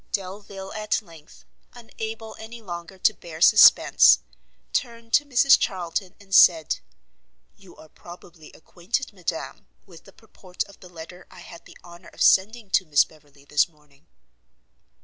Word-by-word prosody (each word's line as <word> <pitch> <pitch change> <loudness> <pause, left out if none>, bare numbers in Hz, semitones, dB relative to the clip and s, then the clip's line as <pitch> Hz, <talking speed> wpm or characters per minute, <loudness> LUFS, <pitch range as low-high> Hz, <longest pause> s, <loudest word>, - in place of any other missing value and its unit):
Delvile 195 0 -7
at 215 -1 -2
length, 165 -5 -18 0.3
unable 225 -1 -8
any 225 +2 -10
longer 175 -2 -9
to - - +2
bear 160 -2 -12
suspence, 210 +5 +6 0.6
turned 230 0 -4
to 290 - +3
Mrs 275 0 +4
Charlton, 180 0 -4
and 195 -1 -14
said, 165 -5 +5 0.8
"You 195 -2 -19
are 155 - -16
probably 170 -1 -15
acquainted, 195 - -5
madam, 175 -3 -6 0.2
with 175 -4 -17
the 195 - -16
purport 190 -4 -8
of 200 -1 -19
the 180 - -15
letter 175 +2 -12
I 180 - -15
had 170 - -14
the - - -16
honour 175 0 -15
of - - -2
sending 210 +2 +2
to 185 - +2
Miss 145 -2 +4
Beverley 145 -2 -23
this 150 +4 +1
morning?" 150 -1 -29
185 Hz, 150 wpm, -23 LUFS, 170-210 Hz, 0.8 s, suspence